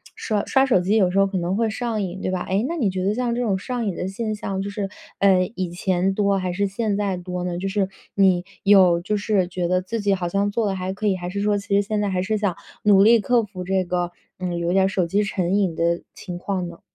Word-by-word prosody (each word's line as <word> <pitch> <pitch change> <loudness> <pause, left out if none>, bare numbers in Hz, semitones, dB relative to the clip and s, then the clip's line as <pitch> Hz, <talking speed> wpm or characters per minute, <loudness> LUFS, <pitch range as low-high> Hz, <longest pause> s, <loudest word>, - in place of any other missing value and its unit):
刷 210 -2 -1
刷 265 0 +3
手 245 -8 +3
机 190 +4 +1
有 190 -4 +4
时 190 - -1
候 195 - +5
可 195 -1 -3
能 175 +2 -1
会 225 +1 +1
上 225 -1 -2
瘾， 185 +1 -5
对 185 - -2
吧？ 185 - -2
诶 200 +5 0
那 335 - -3
你 245 -12 +1
觉 185 0 -3
得 200 - +1
像 240 +1 -1
这 245 - -1
种 210 -6 +1
上 245 +4 -3
瘾 195 -4 -2
的 180 - -3
现 215 +3 -3
象， 195 -2 -3
就 200 - -4
是 200 -1 -3 0.3
嗯， 190 -2 +3
以 185 -1 -2
前 185 +1 0
多 200 -1 +2
还 185 -1 -2
是 200 +2 0
现 205 +1 -1
在 200 -3 -1
多 180 0 -5
呢？ 175 -1 -3
就 190 +2 -3
是 195 -1 0 0.3
你 185 -3 +4 0.2
有 190 -4 +6
就 210 +4 -1
是 200 -3 +1
觉 180 -1 -2
得 180 +1 +1
自 225 +5 -4
己 200 -1 +2
好 180 -2 -1
像 200 +3 0
做 220 +1 0
得 195 - -1
还 185 0 -3
可 210 +2 -2
以， 195 - +2
还 175 -1 -5
是 200 +2 -3
说 205 0 +2
其 200 0 -7
实 200 - +5
现 210 +1 -2
在 205 - 0
还 180 -1 0
是 215 +3 0
想 200 -4 -1 0.3
努 200 -2 +6
力 230 +2 +6
克 240 +3 +2
服 190 -3 -7
这 190 +1 +1
个 175 0 -2 0.3
嗯， 180 -1 -2
有 170 +1 -1
点 190 0 +4
手 185 -3 0
机 200 +5 +1
成 185 -3 -1
瘾 190 -5 +1
的 170 +1 +1
情 175 -1 -7
况 185 -1 -3
呢？ 170 -1 -11
195 Hz, 295 characters per minute, -23 LUFS, 180-205 Hz, 0.3 s, 有